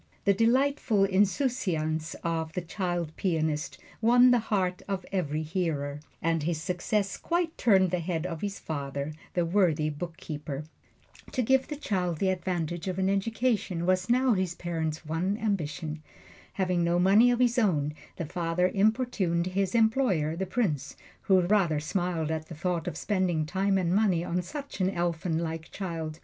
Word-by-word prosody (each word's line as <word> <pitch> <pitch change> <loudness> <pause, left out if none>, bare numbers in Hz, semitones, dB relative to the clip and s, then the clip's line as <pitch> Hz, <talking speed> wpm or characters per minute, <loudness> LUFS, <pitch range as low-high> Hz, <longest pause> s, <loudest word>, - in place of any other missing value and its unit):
The 200 - +5
delightful 235 -1 +2
insouciance 190 - 0
of 160 -1 -2
this 180 -2 -3
child 175 -3 -2
pianist 155 -5 -1 0.2
won 245 +2 +6
the 245 - +5
heart 185 -5 -1
of 195 -2 -3
every 155 -5 -1
hearer, 155 -4 -2 0.2
and 165 -1 +1
his 160 +1 -1
success 180 +3 -1
quite 340 -1 -1
turned 190 -5 +4
the 180 - 0
head 165 -1 -2
of 165 -3 -4
his 200 -1 -3
father, 140 -1 -4 0.2
the 175 -1 +2
worthy 165 -4 +2
bookkeeper. 150 -2 -6 0.7
To 255 - +1
give 265 +3 +3
the 300 - -4
child 180 - -1
the 190 +4 +1
advantages 175 -2 -2
of 185 -1 -2
an 190 0 +1
education 205 -3 0
was 185 +2 +1
now 255 0 +4
his 185 -3 -1
parents' 160 -2 -3
one 175 +6 -1
ambition. 160 -7 -2 0.5
Having 180 -2 +1
no 170 +1 +2
money 200 +7 +6
of 245 - +2
his 245 0 +3
own, 150 -9 +1 0.2
the 170 - -4
father 175 +2 0
importuned 205 -5 +1
his 195 +3 -1
employer, 220 - +2
the 190 +2 -3
Prince, 180 - -1 0.3
who 190 -1 +6
rather 175 -4 +2
smiled 165 0 -1
at 160 0 -3
the 165 - -8
thought 175 +1 -2
of 180 - -3
spending 185 -6 0
time 195 +4 +1
and 175 -2 +1
money 190 -5 +3
on 180 +1 -1
such 280 - -6
an 185 - +3
elfin 170 -2 -1
like 165 -1 -4
child. 165 -5 -5
180 Hz, 160 wpm, -28 LUFS, 160-200 Hz, 0.7 s, won